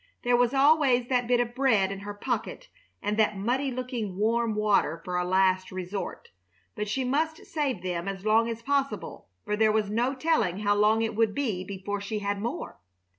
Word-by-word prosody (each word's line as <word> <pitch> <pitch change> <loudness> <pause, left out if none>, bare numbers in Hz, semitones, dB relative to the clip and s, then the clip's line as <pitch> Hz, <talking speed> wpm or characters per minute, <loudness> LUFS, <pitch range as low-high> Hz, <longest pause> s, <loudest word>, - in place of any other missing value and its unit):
There 245 0 +3
was 245 0 +3
always 270 -3 +4
that 250 -2 +1
bit 245 0 +3
of 240 0 -1
bread 230 -7 +2
in 195 - -5
her 205 +1 -6
pocket 245 - -4 0.3
and 210 +1 -1
that 215 -2 +2
muddy 250 +7 0
looking, 245 -6 -4
warm 225 +1 +1
water 205 -6 +2
for 180 - -3
a 180 - +1
last 185 0 +2
resort; 185 +2 -5 0.4
but 210 - -4
she 260 +6 -1
must 315 +5 -1
save 275 - -2
them 175 0 -3
as 195 0 -5
long 225 +2 +3
as 230 0 -5
possible, 275 - -2 0.2
for 210 - 0
there 215 0 +3
was 210 -1 0
no 245 +5 0
telling 260 - +1
how 205 -1 +3
long 215 +2 +3
it 225 - -1
would 225 -1 +1
be 225 -10 -1
before 200 +1 -5
she 205 +2 -3
had 200 -1 -2
more. 240 +10 -5
220 Hz, 195 wpm, -27 LUFS, 200-250 Hz, 0.4 s, always